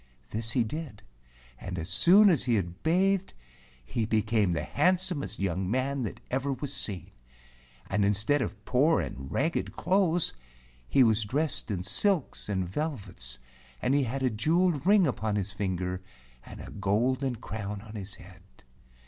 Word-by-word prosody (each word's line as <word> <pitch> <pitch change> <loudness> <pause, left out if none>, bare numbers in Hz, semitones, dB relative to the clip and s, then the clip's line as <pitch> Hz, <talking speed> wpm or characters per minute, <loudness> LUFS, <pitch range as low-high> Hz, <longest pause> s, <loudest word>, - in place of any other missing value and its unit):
This 115 +1 0
he 120 +1 +2
did, 140 -2 -6 0.6
and 90 -1 -6
as 80 0 -4
soon 190 - +6
as 155 -8 +1
he 120 -2 +2
had 90 -3 -3
bathed 190 +3 +1 0.5
he 115 - -2
became 110 -3 +2
the 80 -3 -1
handsomest 175 - 0
young 95 -1 -1
man 130 +4 0
that 110 - -4
ever 135 +2 0
was 140 +1 -3
seen, 95 -6 -3 0.8
and 105 +1 +1
instead 105 +8 +2
of 100 -1 -5
poor 145 +6 +3
and 65 0 -5
ragged 160 +5 -1
clothes 180 -2 +2 0.6
he 135 - +5
was 110 -2 +3
dressed 140 +7 -1
in 95 -4 -2
silks 175 - +1
and 95 -3 -1
vel¬ 150 - -2
vets, 90 - -6 0.4
and 130 - +1
he 145 - +4
had 130 +1 -2
a 130 - +2
jeweled 160 - +1
ring 200 -2 +6
upon 110 -6 -1
his 100 -1 -2
finger, 95 -2 -2 0.5
and - - -9
a - - -9
golden 120 +6 0
crown 105 -2 -5
on 110 0 -12
his 100 -2 -5
head. 95 +1 -15
115 Hz, 160 wpm, -29 LUFS, 100-150 Hz, 0.8 s, soon